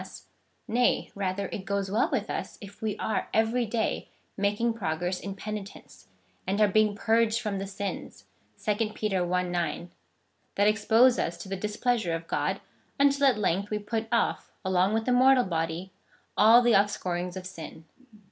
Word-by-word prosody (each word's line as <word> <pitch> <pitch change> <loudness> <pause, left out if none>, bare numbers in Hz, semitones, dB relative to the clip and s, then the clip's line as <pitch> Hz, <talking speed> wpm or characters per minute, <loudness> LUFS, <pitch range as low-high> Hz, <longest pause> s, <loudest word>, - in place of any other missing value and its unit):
59 - - -8
ill - - -14
US; - - -12 0.4
nay, 245 +2 +1
rather, 195 0 -2
it 195 - -5
goes 200 0 -2
well 220 +4 +2
with - - -1
us - - -5
if 200 -1 -12
we 220 -2 -2
are 220 - -2
every 225 +2 +2
day 220 0 -2 0.3
making 210 +4 0
progress 180 -3 -2
in 195 -1 -6
penitence, 210 0 -8 0.4
and 195 +2 0
are 210 - +6
being 210 +1 +2
purged 225 +1 +2
from 210 -4 -3
the 195 - -4
sins 200 0 -6 0.4
(2 215 0 0
Peter 190 -4 -1
i. 180 0 +2
9) 175 0 -3 0.6
that 205 +1 +3
expose 220 +4 +4
us 170 0 -2
to 175 - -9
the 195 - -3
displeasure 210 -2 -1
of 165 0 -7
God, - - -1 0.4
until 280 0 +4
at 250 -5 +3
length 200 0 0
we 210 - -1
put 220 +2 -3
off, 235 - 0 0.2
along 190 +2 +2
with 225 0 -1
the 250 - +1
mortal 255 +1 +5
body, 165 +1 -3 0.4
all 230 +3 +7
the 240 -1 +4
offscourings 180 -3 0
of 185 - -7
sin. 165 -3 -9
205 Hz, 175 wpm, -28 LUFS, 185-225 Hz, 0.6 s, all